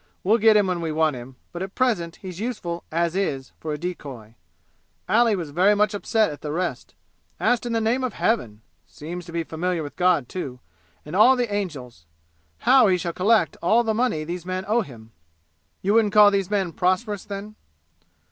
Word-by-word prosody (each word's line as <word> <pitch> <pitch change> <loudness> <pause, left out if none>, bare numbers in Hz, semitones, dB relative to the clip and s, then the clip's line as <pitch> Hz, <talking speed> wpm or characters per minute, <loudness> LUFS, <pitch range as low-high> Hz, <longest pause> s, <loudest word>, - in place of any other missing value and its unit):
We'll 220 +5 +3
get 220 0 +6
him 205 - +3
when 180 -2 -2
we 165 -1 -2
want 155 -2 +1
him, 125 +1 -10 0.2
but 175 - -7
at 190 +1 -6
present 200 -11 0
he's 185 -2 -9
useful 205 -7 -4
'as 170 +1 0
is' 140 -9 -2
for 155 - -5
a 150 - -2
decoy. 140 -10 -7 0.7
Ali 230 -1 +3
was 165 -6 -5
very 190 +7 +4
much 210 0 +2
upset 215 -1 +1
at 145 - -9
the 150 - -4
arrest 175 +3 -3 0.4
asked 245 0 +1
in 235 - -2
the 225 - +1
name 230 +4 0
of 255 - -2
Heaven 115 - -1 0.2
seems 175 +3 -8
to - - -9
be 165 0 -2
familiar 165 +1 -2
with 145 - -8
God, 180 -8 +2
too, 135 -8 -6 0.5
and 150 +4 -6
all 240 +6 +6
the 240 -4 -2
angels! 135 - -5 0.5
how 260 -4 +6
he 185 -2 +3
shall 170 -1 -4
collect 215 +5 +2
all 235 +2 +3
the 220 -1 0
money 220 -9 0
these 170 +2 -5
men 185 +1 -4
owe 225 +3 +2
him!" 115 - -11 0.7
"You 200 +2 +2
wouldn't 215 -2 +3
call 210 -1 +8
these 195 -2 0
men 195 -5 -1
prosperous, 190 +3 0
then?" 205 +1 -7
185 Hz, 195 wpm, -23 LUFS, 160-215 Hz, 0.7 s, call